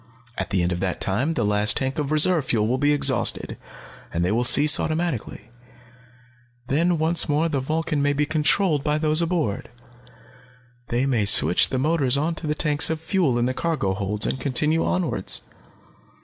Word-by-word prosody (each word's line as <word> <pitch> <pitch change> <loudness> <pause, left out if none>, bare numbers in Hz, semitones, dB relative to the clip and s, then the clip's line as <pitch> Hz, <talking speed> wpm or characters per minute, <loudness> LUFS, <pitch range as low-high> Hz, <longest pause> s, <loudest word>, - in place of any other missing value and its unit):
"At - - -5
the 95 -3 -1
end 90 - -1
of 90 - -3
that 95 -1 -3
time 130 +12 -1
the - - -1
last 105 0 0
tank 135 +2 -2
of 145 -1 -3
reserve 155 0 +2
fuel 110 -4 0
will 130 +3 -1
be 145 +1 +2
exhausted, 140 -4 +1 0.6
and 85 +1 -2
they 90 - -1
will 115 +3 0
cease 145 +5 +5
automatically. 155 -8 -4 1.1
Then 165 +6 0
once 160 +1 +2
more 150 +3 +1
the 145 -4 -2
Vulcan 155 +2 -3
may 145 0 +1
be 145 +1 -1
controlled 155 +1 +1
by 150 0 0
those 155 +1 +2
aboard. 165 - -3 1.2
They 120 +3 -1
may 120 -6 0
switch 95 -2 +4
the 130 - -3
motors 140 -2 +1
onto 160 +2 -3
the 150 - -1
tanks 150 -2 +2
of 160 -1 -3
fuel 160 - -1
in 120 - 0
the 130 - -2
cargo 155 - -2
holds, 105 +2 -2
and 130 - -2
continue 150 +5 0
onwards. 175 - -1
145 Hz, 175 wpm, -22 LUFS, 120-160 Hz, 1.2 s, cease